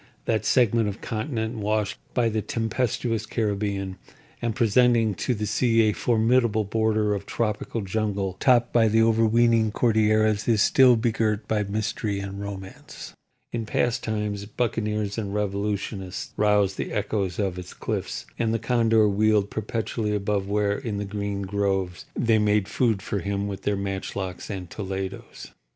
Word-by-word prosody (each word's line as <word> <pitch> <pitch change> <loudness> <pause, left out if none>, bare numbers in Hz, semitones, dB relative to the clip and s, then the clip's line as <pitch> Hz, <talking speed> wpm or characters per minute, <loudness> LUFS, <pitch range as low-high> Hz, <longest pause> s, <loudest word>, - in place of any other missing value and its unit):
That 110 -2 0
segment 115 -3 +3
of 100 - -7
continent 110 0 -3
washed 105 -1 -1 0.2
by 120 -2 +3
the 110 -1 -1
tempestuous 115 -1 -1
Caribbean, 100 -4 -2 0.4
and 115 -2 -1
presenting 115 -1 +3
to 120 +6 -1
the 105 0 -2
sea 115 +1 +2
a 105 -1 +2
formidable 115 -1 +2
border 110 0 +1
of 100 -1 -4
tropical 110 0 -2
jungle 100 -1 -2
topped 120 -3 +3
by 115 -2 +5
the 110 +1 +4
overweening 115 0 +3
Cordilleras, 110 -2 +2
is 110 -3 +4
still 130 0 +6
begirt 110 -2 0
by 110 -1 +1
mystery 105 0 -2
and 100 0 -6
romance. 95 -1 -8 0.4
In 115 -2 -3
past 120 +2 0
times 105 -2 -3
buccaneers 105 -2 -1
and 100 -2 -4
revolutionists 100 -2 -3
roused 105 -2 +2
the - - -3
echoes 95 -4 -1
of 95 -3 -1
its 90 0 -10
cliffs, - - -4
and 115 -1 +1
the - - +2
condor 115 -2 +3
wheeled 105 0 +2
perpetually 110 0 -2
above 100 -1 -1
where, 105 0 +1
in 115 -7 -4
the 100 - -3
green 100 0 -3
groves, 95 -2 -1
they 115 -2 +3
made 105 -1 +2
food 110 -6 0
for 100 - -2
him 100 +2 -2
with 100 -1 -5
their 105 0 0
matchlocks 95 -1 -4
and 95 -4 -5
toledos. 95 -2 -6
105 Hz, 150 wpm, -25 LUFS, 100-115 Hz, 0.4 s, still